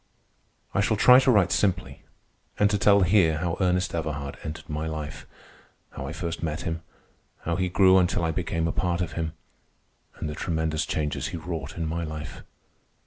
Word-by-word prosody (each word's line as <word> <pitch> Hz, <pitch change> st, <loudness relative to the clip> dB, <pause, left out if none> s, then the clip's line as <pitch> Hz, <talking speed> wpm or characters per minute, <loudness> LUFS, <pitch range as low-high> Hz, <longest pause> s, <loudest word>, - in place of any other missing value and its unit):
I 100 Hz, -, +2 dB
shall 110 Hz, +1 st, +1 dB
try 125 Hz, +4 st, +8 dB
to 135 Hz, -, +2 dB
write 100 Hz, -7 st, +4 dB
simply 95 Hz, -2 st, 0 dB, 0.6 s
and 105 Hz, 0 st, +3 dB
to 105 Hz, -, +1 dB
tell 100 Hz, 0 st, +5 dB
here 90 Hz, -4 st, +4 dB
how 85 Hz, +1 st, -1 dB
Ernest 90 Hz, -1 st, +1 dB
Everhard 75 Hz, -4 st, -3 dB
entered 80 Hz, 0 st, -7 dB
my 75 Hz, +1 st, -3 dB
life—how 75 Hz, -2 st, -9 dB
I -, -, -4 dB
first 85 Hz, 0 st, -4 dB
met 80 Hz, -2 st, -2 dB
him, 80 Hz, 0 st, -3 dB, 0.6 s
how 85 Hz, -, -1 dB
he 95 Hz, -1 st, 0 dB
grew 95 Hz, +1 st, +5 dB
until 85 Hz, -1 st, +1 dB
I 80 Hz, -, +1 dB
became 80 Hz, -1 st, -1 dB
a -, -, 0 dB
part 90 Hz, -1 st, -1 dB
of 85 Hz, -2 st, -2 dB
him, 80 Hz, -1 st, -3 dB, 0.8 s
and -, -, -5 dB
the 75 Hz, -, -4 dB
tremendous 80 Hz, -1 st, -1 dB
changes 75 Hz, -6 st, -2 dB
he -, -, -5 dB
wrought 80 Hz, -3 st, -6 dB
in 85 Hz, -, -2 dB
my 85 Hz, +2 st, -2 dB
life. 75 Hz, -1 st, -6 dB
85 Hz, 180 wpm, -26 LUFS, 80-95 Hz, 0.8 s, try